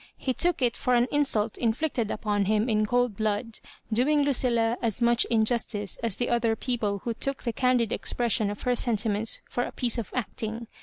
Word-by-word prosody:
He 260 - -1
took 345 -1 +1
it 240 -2 +1
for 250 - +1
an 240 +1 +3
insult 230 -7 0
inflicted 235 -1 0
upon 205 -2 -1
him 215 +3 +1
in 215 -2 +1
cold 245 -2 +1
blood, 215 +2 -2 0.3
doing 290 +6 +3
Lu 280 0 +2
cilia 235 -2 +1
as 225 -3 -1
mach 235 0 +3
injustice 220 -3 0
as 225 -4 -1
the 245 - -1
other 235 -2 +2
people 215 -5 -2
who 235 - -2
took 275 +4 -4
the 235 - -2
candid 245 -2 +1
expression 225 -3 +1
of 205 - -6
her 250 0 +1
sentiments 220 -2 -1
for 245 - -2
a - - -3
piece 240 -1 +1
of 220 - -5
acting. 230 -1 -3
235 Hz, 195 wpm, -27 LUFS, 215-245 Hz, 0.3 s, an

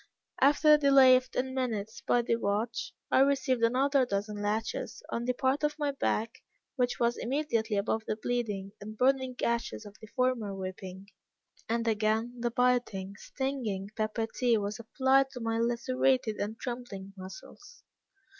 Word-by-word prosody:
After 295 +3 +6
a - - +8
delay 275 -3 +7
of 255 0 0
ten 260 +1 -2
minutes, 225 -5 -3
by 240 - +3
the 230 - +1
watch, 220 +2 -2 0.2
I - - +5
received 270 -2 +2
another 265 +4 +3
dozen 205 -2 -3
lashes, 215 +2 -3
on 235 - -3
the 250 - +1
part 265 +3 0
of 300 0 0
my 295 -2 0
back 230 -4 -2 0.3
which 250 -2 0
was 235 0 +1
immediately 235 -5 -1
above 220 +2 -1
the - - 0
bleeding 215 -4 -3
and 215 +1 -8
burning 260 0 +2
gashes 235 -2 -2
of 205 0 -11
the 220 - -10
former 240 -4 -1
whipping; 190 0 -7 0.6
and 230 0 0
again 220 +2 +1
the 240 0 0
biting, 240 -6 0
stinging, 225 -6 -4
pepper 215 +1 -1
tea 235 +1 +1
was 205 +1 -3
applied 265 +3 +2
to 250 - -6
my 225 -1 -1
lacerated 240 0 +1
and 215 +2 -4
trembling 240 -6 -6
muscles. 190 - -12
235 Hz, 155 wpm, -30 LUFS, 215-260 Hz, 0.6 s, a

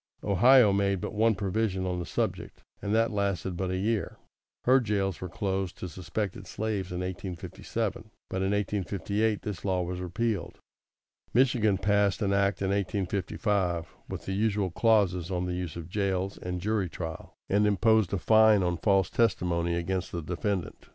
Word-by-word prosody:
Ohio 110 +2 +6
made 100 -1 +1
but - - -5
one 110 +1 +3
provision 95 -1 -1
on 90 -1 -2
the 85 - -5
subject, - - -3 0.2
and 100 - -3
that 115 +1 +3
lasted 100 -3 -1
but 95 +1 -2
a 95 - -1
year. 110 +3 -1 0.5
Her 130 +2 +5
jails 100 -6 -1
were 90 - -4
closed 95 +1 -2
to 90 - -5
suspected 95 +3 -4
slaves 100 -2 -3
in 90 0 -3
1857, 90 -1 -4 0.2
but - - -4
in 95 +1 0
1858 105 +1 -1
this 105 -4 -5
law 95 -2 0
was 90 +1 -4
repealed. 100 0 -2 0.8
Michigan 120 -6 +3
passed 100 0 +2
such 105 - -1
an - - +2
act 100 -1 +1
in 95 - 0
1855, 95 -2 -1
with - - -6
the 95 - -2
usual 100 -2 0
clauses 95 -5 +2
on 90 -1 -1
the 90 - -2
use 90 -2 -4
of 85 -2 -7
jails 95 0 -1
and 90 0 -4
jury 105 -2 0
trial, 80 -1 -7
and 105 +1 +3
imposed 110 -1 +3
a 100 - +1
fine 110 +1 +5
on 90 -1 0
false 95 -1 +2
testimony 90 -6 +1
against 90 +2 -2
the 85 -2 -4
defendant. 90 +2 -3
95 Hz, 170 wpm, -28 LUFS, 90-105 Hz, 0.8 s, Ohio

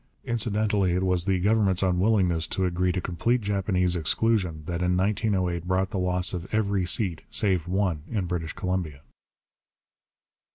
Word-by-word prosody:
Incidentally 105 -4 0
it 90 +1 0
was 90 -2 +1
the 95 -1 +1
Government's 100 -1 +2
unwillingness 90 -3 +2
to 95 -1 -1
agree 90 +1 0
to 90 - -2
complete 115 +8 0
Japanese 95 -3 0
exclusion 90 -1 0
that 85 0 -3
in 90 0 +1
1908 95 -3 0
brought 95 +2 0
the 100 - -2
loss 90 0 +1
of 90 0 -6
every 100 -4 0
seat, 90 -5 +1
save 95 -5 0
one, 90 -4 0
in 105 -5 -1
British 85 -2 -3
Columbia. 90 -6 -3
90 Hz, 150 wpm, -26 LUFS, 90-100 Hz, -, Government's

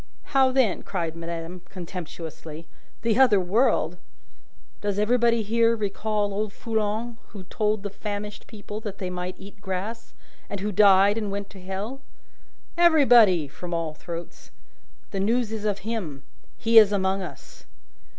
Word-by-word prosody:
"How, 265 -1 +5
then?" 255 -7 +2
cried 165 -4 -3
madame, 170 +1 -6
contemptuously. 165 -3 -8 0.4
"The 230 +1 +2
other 240 -7 +6
world?" 185 -3 +2 0.8
"Does 205 -1 -1
everybody 235 +1 +3
here 230 +2 +3
recall 210 -1 -1
old 210 +1 -2
Foulon, 225 +1 -2
who 200 -3 -10
told 210 +2 -1
the 205 - -4
famished 210 0 -6
people 210 -1 -7
that 210 -3 -6
they 185 -2 -4
might 180 0 -4
eat 200 +1 -13
grass, 200 +4 -5 0.3
and 200 - -4
who 210 +2 -2
died, 200 +1 +5
and 210 -2 -3
went 200 0 -5
to 195 - -12
Hell?" 200 +8 -5 0.8
"Everybody!" 245 - +6
from 175 +5 -6
all 165 -2 -2
throats. 170 +2 -8 0.6
"The 195 - -3
news 225 +3 +1
is 215 -1 -4
of 200 -1 -2
him. 175 -12 -4 0.3
He 230 0 +7
is 210 -2 +5
among 195 -1 +1
us!" 180 - -10
205 Hz, 145 wpm, -25 LUFS, 185-225 Hz, 0.8 s, He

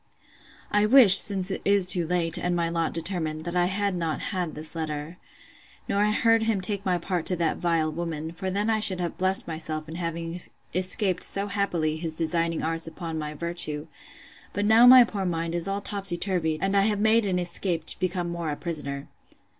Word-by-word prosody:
I 210 0 +2
wish, 235 -5 +9
since 195 -2 +5
it - - -4
is 200 -2 +3
too 180 -2 +4
late, 170 -2 -1
and 180 0 -1
my 170 -1 0
lot 165 -1 -1
determined, 160 -2 -3
that 175 0 -4
I 175 0 +2
had 200 +1 -1
not 165 -3 -3
had 180 -5 -4
this 155 +1 -7
letter, 155 +1 -5 0.7
nor 200 +1 +1
heard 225 +2 +2
him 220 -2 0
take 200 +1 -3
my 185 -2 0
part 175 0 -3
to 180 - +1
that 165 -2 -1
vile 165 -2 0
woman; 160 -1 -5
for 180 +3 -5
then 200 +3 -2
I 220 -1 +1
should 190 -4 +3
have 175 -1 -3
blessed 190 +1 0
myself 155 -1 -4
in 160 - -9
having 165 0 -5 0.3
escaped 185 0 -1
so 200 0 +2
happily 180 -7 -2
his 160 -1 -5
designing 165 0 -1
arts 165 0 -2
upon 165 -1 -6
my 150 0 -6
virtue: 165 -2 -2 0.7
but 205 - -2
now 225 +3 +6
my 255 0 +9
poor 205 -4 -4
mind 165 -2 -3
is 170 0 0
all 200 +1 -3
topsy 195 -4 -3
turvied, 170 -4 -1
and 195 +1 0
I 200 - +4
have 205 0 0
made 220 0 +2
an 185 -2 0
escape 175 -1 -3
to - - -3
be 185 0 0
more 170 -2 -4
a 150 - -3
prisoner. 145 -4 -4
175 Hz, 200 wpm, -25 LUFS, 165-195 Hz, 0.7 s, wish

